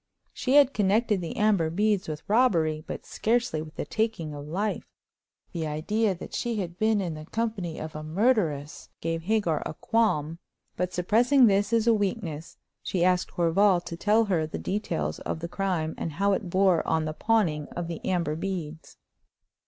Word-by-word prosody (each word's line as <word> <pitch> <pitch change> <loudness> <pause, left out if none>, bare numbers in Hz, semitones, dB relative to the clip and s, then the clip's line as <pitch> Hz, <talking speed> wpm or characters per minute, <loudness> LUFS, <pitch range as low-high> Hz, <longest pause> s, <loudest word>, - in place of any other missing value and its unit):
She 260 +1 0
had 285 -2 +6
connected 210 0 +2
the 165 - -5
amber 205 -7 +3
beads 205 +3 +1
with 155 -1 -6
robbery, 170 -10 +2
but - - -6
scarcely 235 -7 0
with 155 +1 -10
the - - -4
taking 220 -9 -2
of 145 0 -8
life. 200 +7 -2 0.6
The 165 -3 -3
idea 195 +7 0
that 175 - -10
she 240 -2 -2
had 175 -2 -5
been 220 -1 +3
in 180 -4 -2
the 155 0 -9
company 215 -8 -3
of 155 0 -7
a 155 - -5
murderess 160 - 0
gave 165 0 -2
Hagar 175 -5 0
a - - -6
qualm; 165 -9 0 0.4
but, 180 0 -2
suppressing 240 +9 +4
this 205 0 +2
as 230 -1 +2
a 235 - +5
weakness, 195 -7 -3 0.2
she 180 -2 0
asked 180 0 +2
Horval 180 +2 +3
to 170 - -5
tell 215 +6 +3
her 170 -6 0
the - - -5
details 80 - -2
of - - -4
the 170 - -4
crime 175 -4 -2
and 165 - -3
how 200 +6 +1
it 190 -1 -2
bore 185 -2 +3
on 160 -1 +1
the 155 - -3
pawning 165 -7 +1
of 175 -1 -5
the 170 -2 -6
amber 170 -5 0
beads. 165 -3 -5
180 Hz, 180 wpm, -27 LUFS, 160-215 Hz, 0.6 s, had